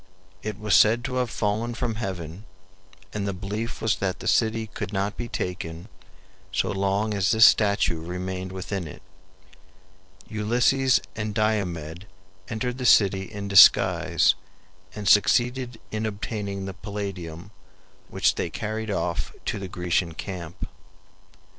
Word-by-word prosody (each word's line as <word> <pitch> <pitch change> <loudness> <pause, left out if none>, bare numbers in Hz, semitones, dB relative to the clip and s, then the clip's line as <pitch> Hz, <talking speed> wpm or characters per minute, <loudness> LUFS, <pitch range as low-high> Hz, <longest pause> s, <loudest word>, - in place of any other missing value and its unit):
It 105 -2 -4
was 105 -2 -1
said 115 +4 +5
to 130 -1 -3
have 125 -2 0
fallen 110 +3 -1
from 120 -1 -2
heaven, 95 -3 -5 0.7
and 100 -1 -2
the 100 - -1
belief 105 +5 -5
was 110 - +2
that 95 -1 -2
the 115 - -6
city 110 +1 +2
could 105 - -6
not 100 +1 -1
be 120 - -5
taken 90 -2 -5 0.6
so 95 - 0
long 100 +2 0
as 100 -2 +1
this 110 0 +7
statue 100 -6 +3
remained 90 +1 -4
within 95 -1 -4
it. 75 - -11 1.2
Ulysses 120 +5 +2
and 110 -1 -4
Diomed 95 -5 -1 0.4
entered 125 +3 -3
the 125 - -3
city 95 -2 +4
in 100 -1 -5
disguise 100 -1 +6 0.6
and 105 -2 -5
succeeded 120 +3 +3
in 110 0 -2
obtaining 100 -2 -4
the 95 - -5
Palladium, 95 -3 -6 0.6
which - - +2
they - - -3
carried 110 +1 -4
off 90 -4 -2
to - - -2
the 95 - -5
Grecian 90 -2 -1
camp. 85 -4 -6
100 Hz, 135 wpm, -25 LUFS, 95-110 Hz, 1.2 s, this